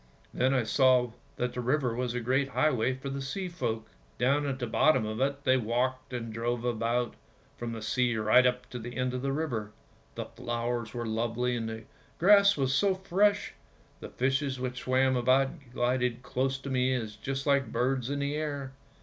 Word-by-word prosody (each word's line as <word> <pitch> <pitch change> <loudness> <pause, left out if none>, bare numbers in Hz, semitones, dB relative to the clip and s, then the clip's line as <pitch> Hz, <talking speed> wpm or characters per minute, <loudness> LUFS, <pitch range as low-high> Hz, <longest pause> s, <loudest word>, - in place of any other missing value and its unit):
" - - -32
Then 130 +1 +2
I 130 -3 +2
saw 125 0 +3 0.2
that 125 -2 -2
the 125 - -3
river 125 -1 +1
was 125 0 -2
a - - 0
great 130 +4 +1
highway 130 -4 +1
for 135 +1 -6
the 140 0 -4
sea 180 +8 -3
folk. 115 -10 -3 0.3
Down 140 +4 +2
at 135 -2 -2
the 125 - -3
bottom 140 +1 +3
of 110 +3 -3
it 140 +1 0
they 130 -1 +4
walked 125 +3 -1
and 115 -3 -4
drove 120 +1 -2
about, 120 0 0 0.4
from 120 -1 -5
the 110 -1 -6
sea 120 +1 +1
right 110 +4 +5
up 125 0 -2
to 125 - -5
the 120 +2 -7
end 125 0 0
of 125 - -3
the 135 +1 -1
river. 120 -8 -3 0.4
The - - -4
flowers 120 -1 -3
were 120 -1 -3
lovely 115 +2 -1
and 115 -2 -3
the 110 0 -6 0.3
grass 200 +1 +6
was 135 -1 +1
so 195 +5 +3
fresh; 195 +2 +1 0.5
the - - -8
fishes 135 +1 0
which 125 0 -3
swam 130 0 +2
about 130 +2 +3 0.2
glided 125 0 0
close 130 +1 -1
to 135 0 -7
me 130 0 +2 0.2
just 135 0 -3
like 140 -2 +2
birds 130 0 0
in 140 - -1
the 140 0 -1
air. 145 -3 -3
125 Hz, 195 wpm, -29 LUFS, 120-135 Hz, 0.5 s, grass